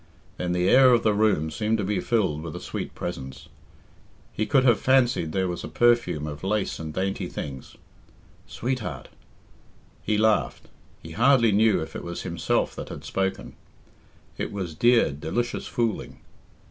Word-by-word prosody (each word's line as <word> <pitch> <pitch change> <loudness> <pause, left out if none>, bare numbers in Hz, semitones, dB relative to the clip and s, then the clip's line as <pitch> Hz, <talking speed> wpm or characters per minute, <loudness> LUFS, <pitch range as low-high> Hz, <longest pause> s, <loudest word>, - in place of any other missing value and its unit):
Then 90 -1 -2
the 90 0 +1
air 130 +3 +7
of 120 - +3
the 110 - +3
room 100 -7 +1
seemed 110 +3 0
to 105 - -2
be 100 +1 -1
filled 95 -11 0
with 80 -1 -7
a - - -5
sweet - - -6
presence. 65 -6 -7 0.8
He 110 - -2
could 135 -3 +3
have 120 -4 +4
fancied 125 -11 +2
there 95 +2 0
was 90 -1 -4
a - - -5
perfume 120 -11 +2
of 75 +1 -7
lace 100 +1 -1
and 80 -1 -5
dainty 95 +4 -2
things. 65 -3 -7 0.7
"Sweetheart!" 120 - -4 0.9
He 105 0 0
laughed 110 0 +1 0.3
he 80 - -9
hardly 120 +2 +4
knew 105 -1 +3
if 80 - -10
it - - -5
was 85 0 -6
himself 85 -3 -1
that - - -6
had - - -8
spoken. 95 0 -2 0.9
It - - -3
was 95 -5 -4
dear, 120 +1 +4
delicious 80 +12 -3
fooling. 115 -3 -2
100 Hz, 160 wpm, -25 LUFS, 80-115 Hz, 0.9 s, air